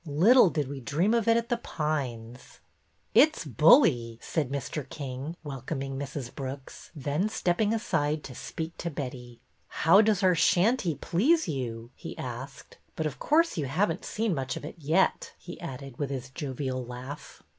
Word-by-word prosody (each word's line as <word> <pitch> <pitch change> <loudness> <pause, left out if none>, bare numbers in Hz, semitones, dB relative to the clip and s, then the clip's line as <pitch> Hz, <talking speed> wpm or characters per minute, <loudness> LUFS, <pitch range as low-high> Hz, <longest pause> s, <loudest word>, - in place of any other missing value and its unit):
Little 185 - +6
did 150 -4 -1
we 140 0 -6
dream 160 - +1
of 230 -2 +1
it 230 0 +5
at 235 0 -2
The 240 - +1
Pines! 130 - -4 0.2
" - - -42
'' - - -42
It 310 +1 +4
's - - -6
bully! 125 - +5
" - - -32
said 150 -6 -1
Mr. 140 0 -4
King, 140 +2 -6
welcoming 135 -1 -5
Mrs. 135 -2 -5
Brooks, 135 0 -7
then 150 +8 -1
stepping 205 0 +1
aside 155 -9 0
to 130 - -8
speak 160 +6 -6
to 170 - -2
Betty. 125 -5 -7 0.3
How 185 +6 +5
does 215 -2 +2
our 185 -1 +5
shanty 180 - +3
please 270 - +2
you? 120 -5 -4
" - - -39
he - - -8
asked. 130 +2 -8
'' - - -39
But, 160 - -2
of 150 - -3
course, 325 - +2
you 145 - -1
have 170 +8 +1
n't 170 - -6
seen 220 -2 -1
much 135 -3 -3
of - - -7
it 170 - -9
yet," 165 +6 +1
he 175 - -10
added, 135 -5 -8
with 145 -2 -1
his 130 -1 -5
.jovial 130 -3 -3
laugh. 125 +4 -9
150 Hz, 190 wpm, -28 LUFS, 130-180 Hz, 0.3 s, Little